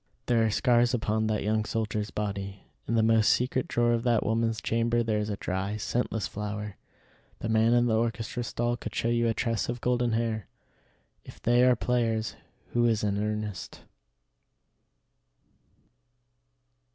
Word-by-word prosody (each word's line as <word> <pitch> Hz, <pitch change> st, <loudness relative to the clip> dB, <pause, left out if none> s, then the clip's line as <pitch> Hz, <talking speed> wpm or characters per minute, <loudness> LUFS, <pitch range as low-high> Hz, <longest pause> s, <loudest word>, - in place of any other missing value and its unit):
There 115 Hz, -2 st, +3 dB
are 110 Hz, -, +2 dB
scars 120 Hz, +3 st, +3 dB
upon 110 Hz, -2 st, 0 dB
that 110 Hz, -1 st, 0 dB
young 110 Hz, +1 st, +1 dB
soldier's 110 Hz, -1 st, -2 dB
body; 100 Hz, -1 st, -4 dB, 0.2 s
in 115 Hz, -, 0 dB
the 110 Hz, -, +4 dB
most 110 Hz, -1 st, +4 dB
secret 125 Hz, +1 st, +1 dB
drawer 120 Hz, 0 st, +2 dB
of 115 Hz, -, +1 dB
that 120 Hz, -2 st, +2 dB
woman's 115 Hz, 0 st, 0 dB
chamber 115 Hz, +1 st, +1 dB
there 110 Hz, -2 st, 0 dB
is 105 Hz, 0 st, -2 dB
a 100 Hz, -, -3 dB
dry, 95 Hz, +3 st, -2 dB
scentless 110 Hz, -1 st, -1 dB
flower; 105 Hz, -1 st, -5 dB, 0.6 s
the -, -, -4 dB
man 110 Hz, +1 st, +4 dB
in 120 Hz, 0 st, +4 dB
the 115 Hz, -2 st, +2 dB
orchestra 115 Hz, +1 st, -1 dB
stall 120 Hz, +1 st, -1 dB
could -, -, -7 dB
show 115 Hz, -, 0 dB
you 120 Hz, 0 st, +2 dB
a 115 Hz, -, 0 dB
tress 115 Hz, -3 st, -1 dB
of 120 Hz, 0 st, -3 dB
golden 120 Hz, -1 st, +1 dB
hair. 110 Hz, -4 st, -1 dB, 0.8 s
If -, -, -13 dB
they 120 Hz, +1 st, +3 dB
are 125 Hz, -1 st, +5 dB
players, 115 Hz, -2 st, 0 dB, 0.3 s
who 120 Hz, 0 st, +2 dB
is 110 Hz, -2 st, +1 dB
in 100 Hz, -1 st, 0 dB
earnest? 105 Hz, -3 st, -4 dB
115 Hz, 160 wpm, -28 LUFS, 105-120 Hz, 0.8 s, are